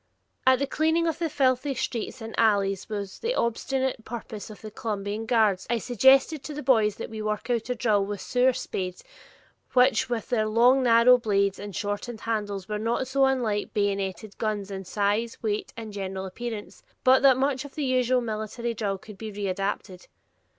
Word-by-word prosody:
As 260 0 +7
the 280 - 0
cleaning 320 +4 +1
of 325 -1 -1
the 330 -2 0
filthy 270 -1 +1
streets 245 0 -3
and 225 0 -7
alleys 200 -3 +2
was 200 -3 -5
the 475 +2 -1
ostensible 260 - -1
purpose 220 -2 -7
of 215 - -11
the 215 - -8
Columbian 210 -1 -4
guards, 215 -6 +2
I 235 - +2
suggested 265 +6 +4
to 300 - -6
the 295 - -5
boys 220 -6 +3
that - - -7
we 220 -1 -5
work 215 +3 -2
out 235 0 -1
a 250 - 0
drill 215 -4 +2
with 200 0 -4
sewer 250 +5 +2
spades, 190 -8 -5 0.7
which 255 0 +4
with 235 -2 -3
their 215 -3 +1
long 240 +5 +5
narrow 245 +1 +6
blades 200 -3 +1
and 205 -2 -7
shortened 205 +4 -4
handles 205 -4 -3
were 210 -1 -3
not 235 +4 -1
so 270 +1 +3
unlike 235 -6 0
bayoneted 200 0 -2
guns 210 -3 -2
in 190 -1 -6
size, 210 +4 0
weight, 210 -1 -2
and 220 -2 -7
general 190 -1 -4
appearance, 220 +2 -6 0.2
but 260 +1 +6
that 265 -2 +6
much 265 0 0
of 285 - -11
the 300 - -2
usual 255 -1 +2
military 225 +1 -3
drill 205 -3 -2
could 200 +1 -13
be 220 -1 -6
readapted. 195 -2 -3
225 Hz, 185 wpm, -26 LUFS, 205-255 Hz, 0.7 s, As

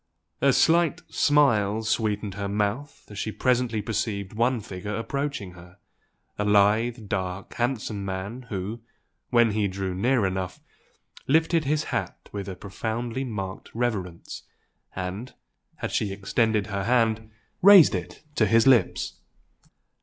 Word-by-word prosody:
A 140 - +5
slight 165 +3 +3
smile 110 -8 +3
sweetened 105 -2 -1
her 100 +1 -4
mouth 105 +8 -2
as 105 - -7
she 110 - -2
presently 120 -3 0
perceived 105 -2 -3
one 120 +3 +1
figure 100 0 -6
approaching 140 -3 -3
her, 90 +1 -15 0.6
a - - +1
lithe, 105 +3 +2
dark, 95 -1 -3
handsome 120 -4 -2
man, 100 +6 -5
who, 100 +4 -4 0.5
when 120 -2 +4
he 105 -1 +1
drew 95 -1 -3
near 115 +4 +2
enough, 95 -1 -3 0.7
lifted 160 +2 +3
his 150 +2 +1
hat - - -4
with 100 -1 -5
a 95 - -5
profoundly 115 +6 -4
marked 100 -6 -5
reverence, 100 -8 -3 0.5
and, 95 +6 -5 0.5
as - - -2
she 105 - 0
extended 105 +2 0
her 100 -2 -3
hand, 115 -2 +1 0.3
raised 195 -3 +8
it - - -5
to 110 -6 +2
his 115 +2 +4
lips. 130 -3 +3
110 Hz, 130 wpm, -26 LUFS, 100-120 Hz, 0.7 s, raised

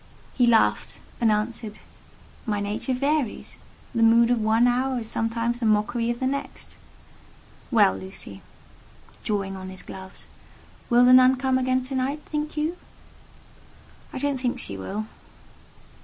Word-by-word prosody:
He 245 -2 +3
laughed, 115 - +2 0.2
and 225 -2 +4
answered, 215 0 -2 0.7
"My 210 -2 0
nature 210 +5 -2
varies: 280 -2 -2 0.3
the 230 - 0
mood 230 +1 +5
of 240 -2 +2
one 220 +2 +3
hour 250 +1 +1
is 225 - -8
sometimes 230 +1 -1
the 230 - 0
mockery 215 +2 +1
of 240 0 -2
the 260 - -1
next. 280 +2 -4 0.9
Well, 210 -6 +4
Lucy" 185 - -7 0.8
(drawing 195 -2 -2
on 190 0 -7
his 185 - -6
gloves), 190 0 -10 0.6
"will 245 0 +5
the 250 - +7
Nun 255 +1 +7
come 260 0 +1
again 255 0 +1
to 260 +2 -6
night, 270 +3 -2
think 300 0 -4
you?" 315 +4 -1 1.3
"I - - -6
don't 280 0 -1
think 250 -1 -1
she 100 - -3
will." 195 - -4
235 Hz, 145 wpm, -25 LUFS, 210-260 Hz, 1.3 s, the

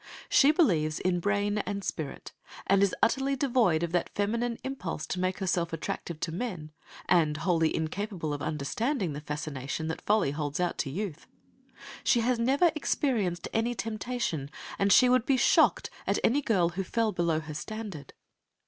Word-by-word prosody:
She 280 - +6
believes 170 - +2
in 180 -1 +1
brain 205 +2 0
and 200 -1 -3
spirit, 155 -4 -5 0.3
and 195 0 +3
is 200 -2 +3
utterly 270 +3 +2
devoid 240 - +2
of 170 - -2
that 175 -1 0
feminine 230 +3 0
impulse 225 - -4
to 180 - -4
make 185 +1 0
herself 175 -3 -1
attractive 165 0 -4
to 165 - -2
men, 180 -5 -4 0.4
and 155 -4 +3
wholly 165 -2 +1
incapable 165 -1 -3
of 145 - -4
understanding 160 - -1
the 145 - -6
fascination 150 0 -4
that 160 - -4
Folly 210 -9 +2
holds 145 0 -3
out 180 -1 -1
to 140 - -1
youth. 175 +1 -5 0.8
She 240 - +3
has 245 +1 +1
never 275 +8 +3
experienced 225 - 0
any 235 +2 0
temptation, 215 - -3 0.3
and 195 0 +3
she 250 +6 +7
would 250 -1 +3
be 270 - +3
shocked - - +3 0.2
at - - +2
any 280 +5 +3
girl 190 -10 +2
who 185 +3 -3
fell 225 +3 0
below 170 -4 0
her 155 -1 -7
standard. 180 - -7
185 Hz, 165 wpm, -29 LUFS, 160-230 Hz, 0.8 s, she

